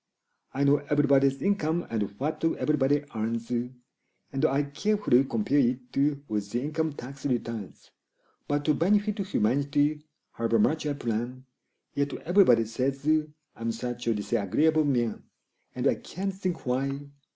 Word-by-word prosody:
I 140 - +1
know 140 +1 +5
everybody's 140 -2 +3
income 175 -4 +1
and 110 -2 0 0.2
what 155 +4 -2
everybody 145 -3 +2
earns, 115 +1 -3
And 125 +3 -5
I 145 -1 +2
carefully 145 -2 +2
compare 130 +4 +1
it 125 -1 0 0.3
with 105 -1 -2
the 120 - -1
income 155 +1 -1
tax 135 +1 -9
returns; 115 -6 -4 0.6
But 145 0 -1
to 150 - +4
benefit 205 +6 +2
humanity, 145 - +1 0.3
however 115 0 0
much 155 +8 +2
I 145 - 0
plan, 120 0 -3 0.5
Yet 140 -1 -1
everybody 160 - +4
says 135 +5 -2 0.5
I'm 115 0 -2
such 120 +1 -5
a 115 - +2
disagreeable 150 - +2
man! 120 -6 0 0.5
And - - -3
I - - +5
can't 195 +3 -5
think 185 -2 -4
why! 135 +2 -1
140 Hz, 135 wpm, -28 LUFS, 120-150 Hz, 0.6 s, know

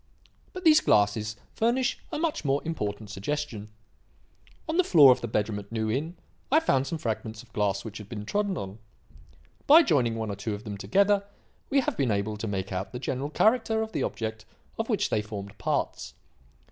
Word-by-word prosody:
But 370 - -8
these 310 -3 +7
glasses 105 +1 +2 0.2
furnish 245 +3 +1
a - - -2
much 320 0 -1
more 140 -1 +1
important 105 -9 -4
suggestion. 110 0 -4 1.0
On 320 +1 -1
the 370 - +5
floor 150 - +8
of 125 0 +2
the - - -3
bedroom 105 -1 -1
at 100 +1 -12
New 110 -1 -1
Inn 160 +8 -3 0.3
I 310 - +6
found 135 - +1
some 165 - -3
fragments 110 -4 -4
of 110 -2 -23
glass 100 -1 0
which 105 -1 -7
had 105 -1 -11
been 105 -3 -6
trodden 200 - -1
on. 95 +2 -6 0.9
By 320 +4 +9
joining 125 - +2
one 110 -2 -3
or - - -4
two 105 +1 -3
of 105 - -10
them 105 -2 -5
together, 200 - +2 0.5
we 275 0 +3
have - - -2
been 135 -4 +1
able 105 +1 -1
to 110 - -4
make 100 -2 -3
out 95 +4 -4
the - - -3
general 135 +2 -3
character 220 +4 +2
of 220 - -6
the - - -2
object 110 -1 -3 0.4
of - - -2
which - - 0
they 105 - +2
formed 105 -1 -7
parts. - - -2
115 Hz, 195 wpm, -27 LUFS, -, 1.0 s, By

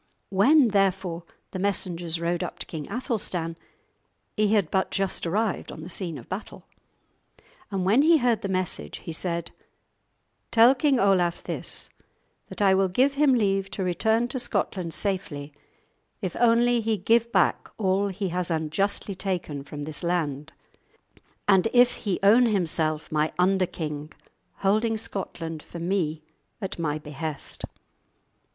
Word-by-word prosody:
When, 250 +7 +5
therefore, 190 -4 0 0.3
the 185 - -5
messengers 175 -4 -1
rode 170 0 -1
up - - -4
to - - -6
King 155 -3 -7
Athelstan, 195 - -2 0.8
he 210 -1 +2
had 195 -7 +1
but 190 -1 +1
just 195 -3 -1
arrived 210 +3 -1
on - - -9
the 180 - -8
scene 170 -4 -4
of - - -11
battle. 190 +3 -7 1.0
And 190 -3 -2
when 215 +8 +5
he 325 +2 +6
heard 245 -5 +1
the - - -2
message 185 - -2
he 165 - -4
said: 170 0 -3 1.0
"Tell 235 +3 +7
King 275 -1 +2
Olaf 180 -3 +2
this, - - -4 0.6
that - - -3
I 195 -1 +5
will 190 0 +3
give 255 +10 +2
him 280 -2 +4
leave 195 -4 +1
to 195 - -3
return 220 +6 +1
to 260 - -3
Scotland 180 -7 -2
safely 155 -8 -3 0.7
if 185 -5 -4
only 240 0 +4
he 220 -1 0
give 230 +4 +2
back - - +2
all 195 -1 +1
he 195 0 -3
has 180 0 -2
unjustly 170 +6 -1
taken 180 -7 -3
from 145 +1 -7
this 155 0 -5
land, 155 -5 -1 1.0
and 195 0 +5
if 245 0 +6
he 200 -5 -1
own 230 +5 +6
himself 160 -6 0
my 155 0 +1
under 185 +1 +3
king, 150 -2 -5 0.5
holding 220 +3 +2
Scotland 170 -7 -5
for 170 - -10
me 165 -3 -1 0.4
and 195 -4 -4
at - - -11
my 155 -2 -1
behest." 150 0 -5
190 Hz, 150 wpm, -26 LUFS, 165-215 Hz, 1.0 s, Tell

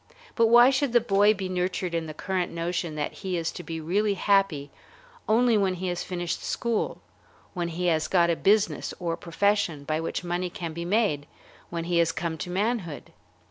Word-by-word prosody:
But 230 -1 +4
why 240 +3 +7
should 270 -2 0
the 240 - +7
boy 205 -1 +3
be 190 -1 -4
nurtured 180 -1 -2
in 165 -1 -1
the 155 - -6
current 185 -1 -2
notion 170 -1 -3
that 150 - -3
he 185 -2 -3
is 165 -1 -2
to - - -7
be 165 -1 -5
really 200 +6 0
happy 195 -9 +1 0.6
only 230 0 +4
when 190 -2 +1
he 185 +1 -3
has 175 0 -2
finished 175 -2 -3
school, 235 -2 -2 0.5
when 175 -3 -2
he 170 +2 -3
has 160 -3 +2
got 170 -2 +3
a - - +1
business 205 +4 +1
or 170 -2 -1
profession 175 -3 0
by 155 +2 -1
which 165 - -3
money 175 +1 -2
can 170 -2 -6
be 170 +1 -5
made, 180 -7 +1 0.4
when 170 -1 -3
he 170 0 +1
has 165 -1 +3
come 165 -1 -3
to 180 - -5
manhood? 190 - -2
180 Hz, 195 wpm, -26 LUFS, 165-205 Hz, 0.6 s, why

